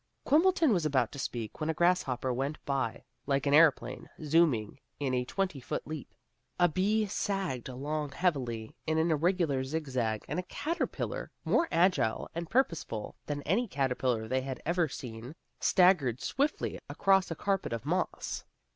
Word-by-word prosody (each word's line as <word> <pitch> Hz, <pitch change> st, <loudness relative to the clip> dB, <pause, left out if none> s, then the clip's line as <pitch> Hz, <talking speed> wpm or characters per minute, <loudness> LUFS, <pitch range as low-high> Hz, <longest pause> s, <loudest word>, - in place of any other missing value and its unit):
Quimbleton 325 Hz, -3 st, +4 dB
was 175 Hz, -4 st, +1 dB
about 130 Hz, -6 st, +1 dB
to 140 Hz, -, -8 dB
speak 115 Hz, -5 st, -4 dB
when 155 Hz, 0 st, -1 dB
a 160 Hz, -, 0 dB
grasshopper 140 Hz, -8 st, +1 dB
went 135 Hz, +4 st, -2 dB
by 135 Hz, -1 st, -1 dB, 0.2 s
like 140 Hz, 0 st, +1 dB
an 140 Hz, -, +2 dB
airplane, 145 Hz, -6 st, +4 dB
zooming 145 Hz, -8 st, +2 dB, 0.2 s
in 135 Hz, -3 st, -1 dB
a 125 Hz, 0 st, +1 dB
twenty 185 Hz, +2 st, -2 dB
foot 125 Hz, -, -4 dB
leap. 155 Hz, -1 st, -7 dB, 0.4 s
A 175 Hz, -, +6 dB
bee 205 Hz, +6 st, +1 dB
sagged 195 Hz, -, -2 dB
along 145 Hz, +3 st, -3 dB
heavily 125 Hz, -11 st, -1 dB
in 160 Hz, 0 st, +1 dB
an 165 Hz, +1 st, +2 dB
irregular 160 Hz, -4 st, +1 dB
zig 155 Hz, +4 st, -3 dB
zag, 115 Hz, -5 st, -1 dB
and -, -, -2 dB
a 180 Hz, -, -6 dB
caterpillar, 335 Hz, +3 st, -3 dB, 0.2 s
more 335 Hz, -, +3 dB
agile 170 Hz, -9 st, +2 dB
and 170 Hz, 0 st, -4 dB
purposeful 165 Hz, -, -1 dB
than 145 Hz, -1 st, -3 dB
any 215 Hz, -, +1 dB
caterpillar 125 Hz, -, 0 dB
they 130 Hz, +3 st, 0 dB
had 130 Hz, 0 st, -5 dB
ever 170 Hz, +1 st, +2 dB
seen, 120 Hz, +2 st, -7 dB, 0.2 s
staggered 175 Hz, -, +4 dB
swiftly 285 Hz, -, -1 dB
across 195 Hz, -1 st, +3 dB
a 165 Hz, -, -3 dB
carpet 195 Hz, -, -1 dB
of 115 Hz, -2 st, -4 dB
moss. -, -, -2 dB
150 Hz, 160 wpm, -31 LUFS, 130-180 Hz, 0.4 s, A